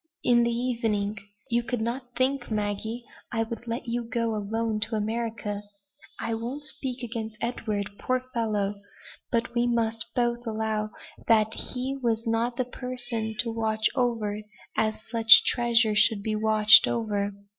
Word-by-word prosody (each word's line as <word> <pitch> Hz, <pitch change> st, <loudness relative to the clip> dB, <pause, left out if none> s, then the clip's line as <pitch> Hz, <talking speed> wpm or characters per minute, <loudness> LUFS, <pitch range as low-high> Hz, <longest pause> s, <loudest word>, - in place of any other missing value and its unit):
in 240 Hz, -1 st, +5 dB
the 235 Hz, -, +2 dB
evening. 230 Hz, -4 st, -1 dB, 0.4 s
You 235 Hz, +1 st, +3 dB
could 240 Hz, 0 st, -3 dB
not 245 Hz, +2 st, -4 dB
think, 260 Hz, 0 st, +1 dB
Maggie, 215 Hz, +2 st, -2 dB, 0.3 s
I 225 Hz, -2 st, +1 dB
would 230 Hz, +1 st, -7 dB
let 230 Hz, +1 st, -3 dB
you 240 Hz, 0 st, -2 dB
go 230 Hz, 0 st, -1 dB
alone 215 Hz, +1 st, -2 dB
to 215 Hz, +1 st, +1 dB
America. 220 Hz, -1 st, -2 dB, 0.6 s
I 230 Hz, -, -2 dB
won't 240 Hz, +6 st, -4 dB
speak 260 Hz, -4 st, -4 dB
against 225 Hz, -2 st, -5 dB
Edward, 215 Hz, -4 st, -2 dB
poor 255 Hz, 0 st, 0 dB
fellow! 205 Hz, -4 st, -1 dB, 0.5 s
but 235 Hz, 0 st, 0 dB
we 240 Hz, 0 st, +2 dB
must 225 Hz, -1 st, 0 dB
both 240 Hz, 0 st, 0 dB
allow 215 Hz, -1 st, -1 dB, 0.4 s
that 220 Hz, -1 st, +4 dB
he 265 Hz, +2 st, -3 dB
was 230 Hz, -1 st, 0 dB
not 230 Hz, +2 st, 0 dB
the 255 Hz, -, 0 dB
person 245 Hz, -3 st, -4 dB
to 230 Hz, -, -4 dB
watch 220 Hz, -1 st, -1 dB
over 225 Hz, -5 st, 0 dB
you 215 Hz, -, -8 dB, 0.3 s
as 215 Hz, 0 st, 0 dB
such 230 Hz, 0 st, +8 dB
a -, -, -18 dB
treasure 235 Hz, -2 st, +3 dB
should 210 Hz, -1 st, +3 dB
be 215 Hz, 0 st, -1 dB
watched 215 Hz, 0 st, +7 dB
over. 205 Hz, -3 st, -1 dB
230 Hz, 155 wpm, -27 LUFS, 215-240 Hz, 0.6 s, such